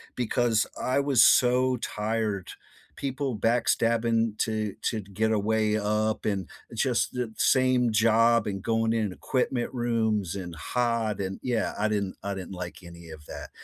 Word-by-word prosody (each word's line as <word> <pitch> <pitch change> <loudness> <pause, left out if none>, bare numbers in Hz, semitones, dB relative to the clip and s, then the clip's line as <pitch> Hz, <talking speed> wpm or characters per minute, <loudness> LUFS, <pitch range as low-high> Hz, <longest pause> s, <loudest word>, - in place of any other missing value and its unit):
because 120 -2 +1 0.2
I 130 +2 +1
was 140 -5 +4
so 125 +1 +4
tired. 105 -3 -2 0.4
People 135 -3 -3
backstabbing 115 -1 +1
to 110 -2 -1
to 110 -3 -1
get 105 +3 -1
a 110 - +2
way 110 0 +1
up 105 +1 -1
and 95 -5 -1 0.3
just - - 0
the 125 -3 -3
same 130 -2 +3
job 115 +1 +4
and 95 -1 -3
going 115 +1 +1
in 110 -4 0
equipment 125 +4 -2
rooms 110 -6 0
and 90 -3 -6
hot 115 +3 -1
and, 95 0 -4
yeah, 120 -3 -1
I 110 - +2
didn't 100 -3 -2
I 100 - -2
didn't 95 -1 -7
like 90 -1 -6
any 85 -1 -12
of 75 -1 -11
that, - - -8
110 Hz, 155 wpm, -27 LUFS, 100-120 Hz, 0.4 s, was